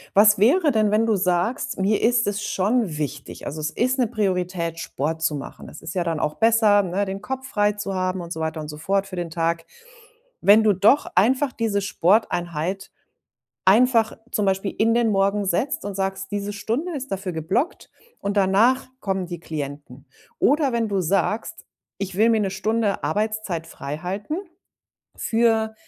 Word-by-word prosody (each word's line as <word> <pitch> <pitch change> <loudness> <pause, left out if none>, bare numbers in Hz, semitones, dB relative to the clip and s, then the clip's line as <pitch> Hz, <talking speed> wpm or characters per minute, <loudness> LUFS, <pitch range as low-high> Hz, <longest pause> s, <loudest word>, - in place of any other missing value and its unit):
Was 205 0 +6
wäre 295 - +4
denn, 215 -3 +2
wenn 215 +2 +3
du 225 -2 +2
sagst: 185 +8 0
„Mir 200 +2 +1
ist 235 0 +3
es 205 0 -1
schon 205 -4 0
wichtig, 145 -2 -5
also 155 +2 -5
es 155 - -1
ist 255 - 0
'ne 245 - +3
Priorität, 180 -6 -2
Sport 160 0 -3
zu 160 -2 +1
machen?" 140 - -8
Das - - -11
ist 165 - -7
ja 180 - 0
dann 165 -2 -2
auch 150 - -1
besser, 220 -2 +4
ne, 190 +2 -1
den 195 0 -5
Kopf 265 +3 -5
frei 210 -2 +2
zu 205 -1 -4
haben 185 0 -1
und 170 0 -6
so 160 - -7
weiter 160 0 -3
und 150 - -7
so 150 0 -8
fort 195 +5 0
für 195 -1 -8
den 175 -2 -3
Tag. 165 0 -1 0.8
Wenn 210 +2 +6
du 215 -1 +4
doch 205 +10 +4
einfach 255 +8 +3
diese 210 -3 -1
Sporteinheit 180 -2 0 0.7
einfach 225 +3 +4
zum 210 - 0
Beispiel 195 0 0
in 225 +1 +3
den 235 -1 +2
Morgen 200 0 +1
setzt 275 - -1
und 205 - -4
sagst: 190 0 -3
„Diese 205 0 -3
Stunde 240 - -3
ist 270 -2 -5
dafür 195 -1 -3
geblockt 185 - -2 0.3
und 200 +1 -3
danach 205 +7 +3
kommen 190 -2 -2
die 175 -1 -7
Klienten.“ 145 -3 -7 0.3
Oder 285 -1 +3
wenn 230 -1 0
du 200 -2 0
sagst: 195 +5 -1 0.3
„Ich 195 -2 -4
will 220 +3 +4
mir 225 -1 +3
'ne 195 -2 0
Stunde 210 +2 -1
Arbeitszeit 205 0 -2
freihalten, 180 - -5 0.8
für 225 -1 +1
200 Hz, 180 wpm, -23 LUFS, 175-220 Hz, 0.8 s, Was